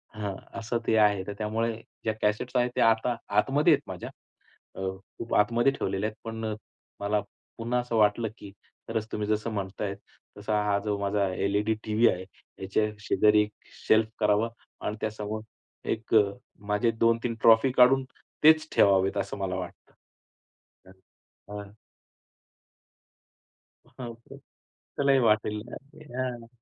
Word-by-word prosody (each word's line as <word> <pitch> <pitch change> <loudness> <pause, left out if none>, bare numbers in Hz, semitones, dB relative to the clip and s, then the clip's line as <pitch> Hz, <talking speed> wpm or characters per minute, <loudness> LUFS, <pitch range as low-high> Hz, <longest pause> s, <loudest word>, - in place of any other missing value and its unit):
हं, 100 -2 -3 0.2
असं 115 +1 -2
ते 110 - +3
आहे. 105 -3 +4
तर 100 - -3
त्यामुळे 110 +2 -1 0.3
ज्या 110 - 0
कॅसेट्स 105 +5 0
आहेत 125 0 +2
ते - - +1
आता 115 +2 +3 0.2
आतमध्ये 145 +7 +4
आहेत - - +1
माझ्या. - - -6 0.7
अ, - - -8 0.4
खूप 115 - -3
आतमध्ये 120 +5 +3
ठेवलेले 100 -5 -2
आहेत, 110 - -5
पण 115 0 -5
अ, 110 - -2 0.5
मला, 105 +1 +1 0.4
पुन्हा 120 +2 -1
असं 120 -2 -3
वाटलं, 105 +1 +3
की 100 - -10 0.4
खरच 110 -1 -2
तुम्ही 105 -1 -2
जसं 110 +2 0
म्हणताय, 100 0 -3 0.4
तसा 105 0 0
हा 100 -1 +2
जो 105 -1 -1
माझा 100 -1 0
एल-ई-डी 105 +3 +1
टीव्ही 110 +2 +4
आहे, 90 +1 -2 0.3
ह्याच्या 95 +3 0 0.2
शेजारी 105 0 +4
एक 105 - -4 0.4
शेल्फ 110 0 +5
करावा 105 +2 +3 0.4
आणि 105 - -2
त्यासमोर 110 0 -4 0.5
एक 110 0 -2
अ, 105 -2 +7 0.4
माझे 105 +3 +2
2-3 115 0 +2
ट्रॉफी 115 +3 +6
काढून, 130 +1 +6 0.4
तेच 155 +1 +6
ठेवावेत 95 0 +4
असं 100 - -3
मला 95 -2 -2
वाटतं. 90 - -8 0.9
हं. 95 - -15 0.7
हां. 100 - -13 2.2
हां 125 -2 -9
ओके. 115 0 -14
त्यालाही 140 -1 -2
वाटेल. 105 0 +1
नक्कीच. 135 -2 -12
हां. 125 -3 -3
110 Hz, 140 wpm, -27 LUFS, 105-115 Hz, 2.2 s, अ